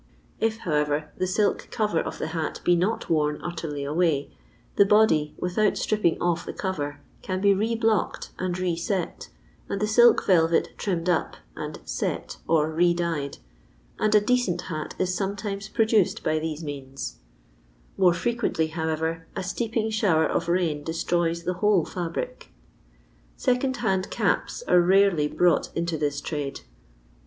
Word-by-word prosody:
I^ 220 0 +1
however, 150 -5 -1
the 185 - -1
silk 205 +3 0
cover 210 -7 0
of - - -4
the - - -3
hat 160 -1 -3
be 175 - +4
not 185 +6 0
worn 150 -2 +1
utterly 160 -5 -4
away, 150 -1 0 0.4
the - - +7
body, 200 -8 +3
without 195 +4 +1
stripping 210 -6 +1
off 175 -1 0
the - - -6
cover, 145 -7 -3 0.2
can 185 0 -3
be 200 +1 +4
re 220 +4 0
blocked 225 -2 0
and 185 -1 -2
re 180 -2 0
set, 180 +2 -3 0.4
and 200 - -2
the 210 - +1
silk 235 +3 +5
velvet 165 -3 +3
trimmed 180 -4 -2
up 175 -3 0 0.2
and - - -6
" - - -26
set,'' - - -3
or 160 -1 +2
re 170 +2 +3
dyed, 165 -5 -2 0.6
and 215 0 +2
n 210 - +5
decent 230 -8 +1
hat 155 -1 -5
is 185 0 0
sometimes 200 +1 -3
produced 220 -4 +2
by 155 0 +1
these 160 0 -4
mauMi 135 -3 -6 0.8
More 180 -3 +4
frequently, 180 -4 0
however, 160 0 -2
a - - -3
steeping 220 +3 -1
shower 190 -8 +3
of 165 - -1
rain 170 -4 +1
destroys 170 +1 -1
the 180 - -1
whole 205 -6 +4
fiUnic. 180 - -4 0.9
Second 260 0 +1
ZuAful 195 -5 0
Caps - - -1
are 180 - +6
rarely 185 -4 +4
brought 175 +3 +2
into 170 0 -1
this 145 -2 -1
trade. 145 -3 -4
175 Hz, 155 wpm, -25 LUFS, 160-205 Hz, 0.9 s, the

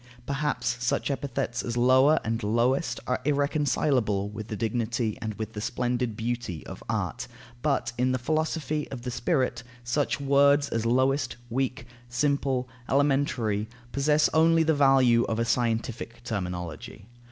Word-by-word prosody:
Perhaps 130 -4 -1
such 125 - 0
epithets 130 -3 -2
as 120 0 -4
"lower" 130 +5 +5
and 115 +1 -2
"lowest" 120 +8 +1
are 125 - -1
irreconcilable 140 -7 +1
with 110 0 -7
the 110 - -4
dignity 115 +1 -1
and 110 -2 -4
with 110 +1 -5
the 105 - -5
splendid 125 -1 -1
beauty 115 -7 -3
of - - -9
art? - - -2 0.3
But - - 0
in 130 +1 +2
the 130 - +1
philosophy 155 +1 -1
of 125 -3 -7
the 125 - -3
spirit, 125 -1 0 0.2
such 130 +5 0
words 140 +1 +4
as 115 0 -1
lowest, 130 +1 +1
weak, 130 -1 -1 0.2
simple, 135 0 0 0.2
elementary, 135 -7 +1 0.2
possess 150 +2 +3
only 165 +1 +5
the 160 0 +3
value 135 -5 +5
of 110 - -2
a 115 - +1
scientific 115 0 -1
terminology. 90 -3 -5
125 Hz, 140 wpm, -27 LUFS, 115-140 Hz, 0.3 s, lower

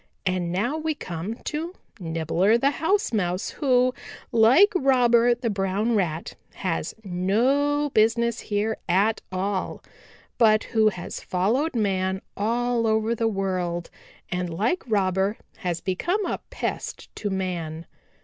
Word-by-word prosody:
And 180 -2 0
now 235 - 0
we 315 0 -1
come 180 - -5
to 330 +4 -4 0.2
Nibbler 165 +5 +1
the 275 +4 +2
House 325 +3 0
Mouse, 180 -3 -1
who, 255 -3 +2 0.4
like 255 - +6
Robber 245 -5 +4
the 235 -2 -2
Brown 195 +4 0
Rat, 170 -5 -1 0.2
has 165 -4 -2
no 260 +11 +1
business 235 +1 +2
here 215 +1 -1
at 205 +5 +2
all, 190 +1 -2 0.6
but 215 -2 +5
who 220 -1 +3
has 180 -4 -7
followed 240 - 0
man 190 -3 0
all 235 +2 0
over 220 +1 +2
the 230 0 0
world 185 -4 -2 0.4
and 180 0 -1
like 220 - 0
Robber 195 -1 +1 0.2
has 175 -2 -3
become 345 - -1
a - - -2
pest - - -5
to 205 - -2
man." 170 -4 -3
215 Hz, 130 wpm, -25 LUFS, 185-240 Hz, 0.6 s, like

